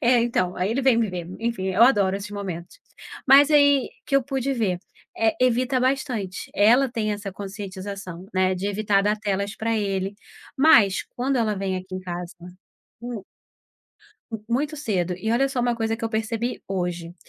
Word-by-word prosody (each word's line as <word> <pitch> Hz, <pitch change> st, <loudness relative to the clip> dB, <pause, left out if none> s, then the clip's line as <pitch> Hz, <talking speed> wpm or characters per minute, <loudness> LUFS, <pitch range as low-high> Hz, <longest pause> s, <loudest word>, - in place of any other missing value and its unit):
É, 240 Hz, 0 st, +4 dB
então, 185 Hz, -7 st, 0 dB
aí 185 Hz, +4 st, 0 dB
ele 265 Hz, +4 st, 0 dB
vem 255 Hz, -3 st, +4 dB
me 225 Hz, -4 st, +1 dB
ver, 175 Hz, -2 st, -5 dB
enfim, 230 Hz, -5 st, -2 dB
eu 190 Hz, +5 st, +3 dB
adoro 200 Hz, -7 st, +4 dB
esses 200 Hz, +1 st, -7 dB
momentos. 195 Hz, -, -6 dB, 0.5 s
Mas 280 Hz, +2 st, +7 dB
aí 285 Hz, -3 st, +5 dB, 0.2 s
que 275 Hz, -, -2 dB
eu 275 Hz, -, +3 dB
pude 270 Hz, 0 st, -2 dB
ver. 195 Hz, -7 st, 0 dB, 0.4 s
Eh, 225 Hz, -1 st, +2 dB
evita 255 Hz, +1 st, +2 dB
bastante. 255 Hz, -8 st, -2 dB
Ela 240 Hz, +7 st, +5 dB
tem 215 Hz, -3 st, -2 dB
essa 205 Hz, -2 st, -5 dB
conscientização, 195 Hz, -2 st, -7 dB
né, 185 Hz, 0 st, +2 dB
de 185 Hz, +2 st, -3 dB
evitar 205 Hz, -1 st, +1 dB
dar 210 Hz, +1 st, +1 dB
telas 200 Hz, -1 st, -2 dB
pra 225 Hz, 0 st, -1 dB
ele. 195 Hz, -1 st, -2 dB, 0.4 s
Mas 220 Hz, -, +5 dB
quando 260 Hz, +2 st, 0 dB
ela 220 Hz, -3 st, +1 dB
vem 190 Hz, -1 st, -2 dB
aqui 185 Hz, 0 st, -7 dB
em 185 Hz, -, -4 dB
casa 175 Hz, -1 st, -6 dB, 0.7 s
Hum. 240 Hz, -5 st, -6 dB, 1.1 s
M 225 Hz, -2 st, -5 dB
muito 295 Hz, +6 st, -1 dB
cedo. 185 Hz, -, -1 dB
E 220 Hz, +4 st, -3 dB
olha 270 Hz, +3 st, +2 dB
só 265 Hz, -2 st, -2 dB
uma 240 Hz, 0 st, +1 dB
coisa 225 Hz, -1 st, -1 dB
que 225 Hz, -, -6 dB
eu -, -, 0 dB
percebi 225 Hz, +2 st, -2 dB
hoje. 175 Hz, -2 st, -3 dB
215 Hz, 180 wpm, -24 LUFS, 190-245 Hz, 1.1 s, Mas